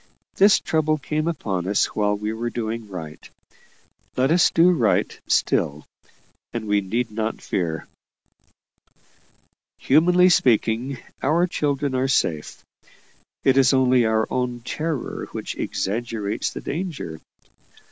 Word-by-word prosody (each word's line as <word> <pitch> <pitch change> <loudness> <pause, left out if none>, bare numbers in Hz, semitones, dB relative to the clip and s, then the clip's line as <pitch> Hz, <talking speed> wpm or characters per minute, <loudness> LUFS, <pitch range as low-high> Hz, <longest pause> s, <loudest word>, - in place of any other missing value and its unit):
This 200 +1 +5
trouble 155 -1 0
came 155 +2 -2
upon 100 - -2
us 100 +1 +2
while 105 -1 +1
we 105 +1 -3
were 115 +2 -3
doing 115 -2 -4
right; 80 -5 -8 0.9
let 130 +3 +2
us 175 +1 +5
do 170 +2 +5
right 125 -11 +1
still, 75 +2 +1 0.7
and 115 -2 -4
we 105 0 +2
need 115 +5 -2
not 110 +1 -3
fear. 80 -4 -3 1.9
Humanly 180 +6 +4
speaking, 125 -2 +2 0.2
our 165 +6 +2
children 145 -5 -1
are 130 +1 +1
safe; 80 - -1 0.8
it 135 0 +4
is 135 0 +5
only 130 -1 +4
our 110 0 +2
own 125 -1 -2
terror 155 +2 -4
which - - -5
exaggerates 105 0 -2
the - - -7
danger. 150 - -5
120 Hz, 120 wpm, -23 LUFS, 105-150 Hz, 1.9 s, This